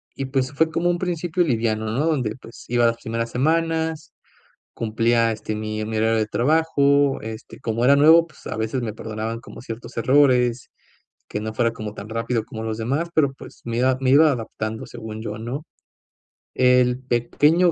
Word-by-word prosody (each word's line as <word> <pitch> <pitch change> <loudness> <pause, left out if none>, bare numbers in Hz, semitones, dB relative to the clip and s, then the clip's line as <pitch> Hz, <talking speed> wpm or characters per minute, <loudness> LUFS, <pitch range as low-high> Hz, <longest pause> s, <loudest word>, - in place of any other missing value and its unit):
y, 135 - -3
pues, 130 0 -1
fue 160 +3 +2
como 175 +2 +1
un 175 - -2
principio 175 -1 0
liviano, 110 -5 0
¿no?, 135 +7 0
donde, 125 -9 0
pues, 115 - -13
iba 120 0 +3
las 115 - 0
primeras 115 +1 -3
semanas, 160 +2 0 0.6
cumplía, 115 +1 +1
este, 110 0 -5
mi 110 0 -3
mi 110 0 -2
horario 110 +1 +2
de 110 - +2
trabajo, 140 +1 +2
este, 110 +3 -8
como 115 +1 -1
era 140 +2 +6
nuevo, 160 +3 +6
pues, 150 - -20
a - - -4
veces 110 +4 -2
me 110 -3 -4
perdonaban 110 +1 -5
como 115 - -11
ciertos 115 -1 -8
errores, 125 -2 +3 0.6
que 105 - -3
no 110 +1 -4
fuera 115 -1 +1
como 110 -2 -7
tan 100 - -8
rápido 115 0 -2
como 110 - -7
los 110 0 -3
demás, 140 +9 -1
pero, 140 -4 +3
pues, - - -13
me 115 0 -3
iba 130 +1 +3
me 130 -1 +1
iba 150 +3 +6
adaptando, 110 -2 -5
según 110 -2 -8
yo, 105 -2 -5
¿no? 125 +7 -5 0.9
El 125 -1 +4
pequeño 145 +8 +2
120 Hz, 185 wpm, -22 LUFS, 110-145 Hz, 0.9 s, era